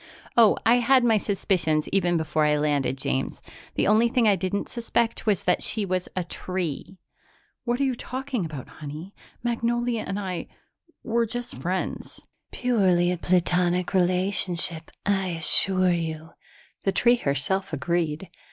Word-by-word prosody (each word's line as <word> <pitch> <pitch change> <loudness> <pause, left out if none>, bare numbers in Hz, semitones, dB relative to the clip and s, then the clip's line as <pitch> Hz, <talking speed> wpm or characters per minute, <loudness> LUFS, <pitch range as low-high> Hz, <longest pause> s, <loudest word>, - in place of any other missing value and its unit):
Oh, 230 -3 +5
I 235 +2 +5
had 250 +1 +4
my 225 -2 +4
suspicions 180 -7 0
even 175 -3 +1
before 160 -1 0
I 150 0 +2
landed, 145 -3 0
James. 135 0 -3 0.4
The - - +1
only 220 +3 +4
thing 245 -2 +2
I 205 - +5
didn't 190 +2 -3
suspect 230 -1 -2
was 205 -4 +1
that 180 - +1
she 215 -2 -1
was 185 -1 -2
a 185 - -1
tree!" 180 0 -5 0.7
"What 240 +1 -1
are - - +1
you 265 -1 +1
talking 260 -2 -4
about, 150 -6 -7
honey? 155 +6 -9 0.3
Magnolia 240 -1 -1
and 195 - -3
I 185 -3 -4 0.6
we're 235 -1 0
just 245 +2 -5
friends." 185 +4 -4 0.3
"Purely 185 -8 +2
a 180 - -2
platonic 180 0 +1
relationship, 180 -2 +2 0.2
I 195 -2 +1
assure 185 +3 +5
you," 160 -1 -4 0.5
the 195 - 0
tree 240 +4 +3
herself 185 - -1
agreed. 160 +2 -2
185 Hz, 145 wpm, -25 LUFS, 170-225 Hz, 0.7 s, Oh